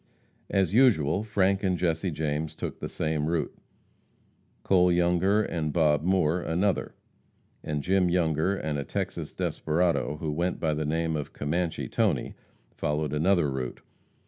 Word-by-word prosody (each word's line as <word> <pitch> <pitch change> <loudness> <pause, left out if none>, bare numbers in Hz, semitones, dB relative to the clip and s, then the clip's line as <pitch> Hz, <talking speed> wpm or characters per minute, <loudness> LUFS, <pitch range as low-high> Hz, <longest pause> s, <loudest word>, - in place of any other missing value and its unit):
As 95 -2 +1
usual, 100 - +4
Frank 100 -2 +1
and 95 -2 +1
Jesse 85 +1 0
James 75 0 -2
took - - -5
the - - -5
same 75 -1 -1
route; 85 -1 -1 1.1
Cole 90 -2 +4
Younger 90 +4 +3
and 80 -6 -2
Bob 75 -2 +3
Moore 90 -1 +2
another, 90 +4 -1 0.7
and 75 -2 -3
Jim 95 -1 +2
Younger 85 +1 +1
and 75 -5 -3
a - - -2
Texas - - -4
desperado 80 -2 0
who 75 0 -3
went 85 +4 -1
by 80 -2 0
the 75 0 -2
name 80 +1 0
of 75 -2 -5
Commanche 80 +3 -2
Tony, - - 0 0.4
followed 75 0 -2
another 85 +1 +3
route. 65 -2 -4
80 Hz, 145 wpm, -27 LUFS, 75-90 Hz, 1.1 s, usual